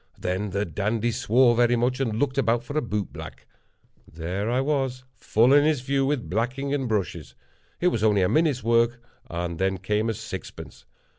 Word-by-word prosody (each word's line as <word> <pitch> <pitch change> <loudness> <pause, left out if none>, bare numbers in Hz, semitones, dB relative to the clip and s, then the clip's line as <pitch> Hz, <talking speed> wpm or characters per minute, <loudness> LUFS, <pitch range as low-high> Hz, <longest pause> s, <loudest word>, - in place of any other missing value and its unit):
Then 95 +3 -2
the 100 +2 -1
dandy 105 +7 -1
swore 120 +1 +3
very 120 +1 +3
much, 125 +2 0
and 115 -5 -1
looked 135 +1 0
about 120 -1 +1
for 145 +4 -8
a 155 - +2
boot 105 - -3
black. - - -9 0.7
There 90 +7 -3
I 125 +2 +1
was, 135 -2 -1
full 115 +4 +3
in 145 0 +6
his 150 -4 +2
view, 135 +1 0
with 140 -4 -1
blacking 125 +7 -2
and 135 -4 -1
brushes. 85 -10 -3 0.4
It 180 - +3
was 110 -10 -2
only 105 -3 +3
a - - +3
minute's 150 -6 +2
work, 115 +1 +2 0.3
and 85 -1 -4
then 95 0 +1
came 105 +4 -1
a 110 - -1
sixpence. - - -8
115 Hz, 190 wpm, -25 LUFS, 105-130 Hz, 0.7 s, in